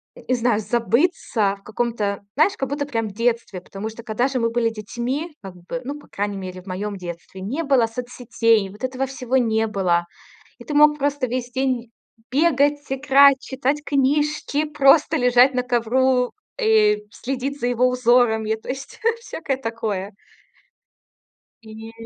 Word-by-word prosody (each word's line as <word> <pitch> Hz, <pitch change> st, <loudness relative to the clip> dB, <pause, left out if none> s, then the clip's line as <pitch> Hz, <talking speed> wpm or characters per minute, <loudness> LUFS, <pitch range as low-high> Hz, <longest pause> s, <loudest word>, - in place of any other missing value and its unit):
не 370 Hz, -, -2 dB
знаю, 235 Hz, -3 st, +1 dB
забыться 230 Hz, -, +1 dB
в -, -, -30 dB
каком-то, 215 Hz, -3 st, -2 dB
знаешь, 345 Hz, +7 st, +4 dB
как 270 Hz, -1 st, -2 dB
будто 285 Hz, 0 st, -2 dB
прям 225 Hz, -5 st, -2 dB
в 200 Hz, -, -9 dB
детстве. 230 Hz, -4 st, -1 dB
Потому 195 Hz, +4 st, -6 dB
что, 225 Hz, +1 st, -11 dB
когда 235 Hz, +2 st, 0 dB
же 265 Hz, -2 st, -2 dB
мы 230 Hz, -1 st, +1 dB
были 230 Hz, 0 st, +1 dB
детьми, 240 Hz, -, -4 dB
как 190 Hz, -2 st, -9 dB
бы, 180 Hz, +9 st, -6 dB
ну, 285 Hz, +2 st, -4 dB
по -, -, -18 dB
крайней 205 Hz, 0 st, -3 dB
мере, 185 Hz, -1 st, -7 dB
в 190 Hz, -, -22 dB
моём 200 Hz, +2 st, -4 dB
детстве, 175 Hz, +1 st, -8 dB
не 260 Hz, +13 st, -3 dB
было 270 Hz, -6 st, +3 dB
соцсетей, 230 Hz, -3 st, 0 dB
вот 210 Hz, +6 st, -14 dB
этого 260 Hz, +1 st, -1 dB
всего 260 Hz, -1 st, -2 dB
не 225 Hz, -2 st, +2 dB
было. 180 Hz, -5 st, +1 dB, 0.5 s
И -, -, -12 dB
ты 300 Hz, -, -5 dB
мог 300 Hz, 0 st, +5 dB
просто 285 Hz, -2 st, 0 dB
весь 245 Hz, 0 st, -3 dB
день 255 Hz, -2 st, -1 dB, 0.4 s
бегать, 290 Hz, -1 st, +2 dB
играть, 275 Hz, 0 st, +5 dB
читать 275 Hz, +3 st, -2 dB
книжки, 295 Hz, +2 st, +1 dB
просто 295 Hz, 0 st, +4 dB
лежать 250 Hz, +1 st, +5 dB
на 250 Hz, 0 st, 0 dB
ковру 250 Hz, +1 st, +1 dB, 0.3 s
и 425 Hz, -1 st, +3 dB
следить 270 Hz, +2 st, -4 dB
за 245 Hz, -, -1 dB
его 245 Hz, +1 st, +2 dB
узорами. 240 Hz, -3 st, +2 dB
То 220 Hz, -, -13 dB
есть 270 Hz, +1 st, -6 dB, 0.2 s
всякое 315 Hz, -, -4 dB
такое. 220 Hz, -5 st, -4 dB, 1.5 s
И. 220 Hz, +1 st, -10 dB
245 Hz, 160 wpm, -22 LUFS, 220-275 Hz, 1.5 s, мог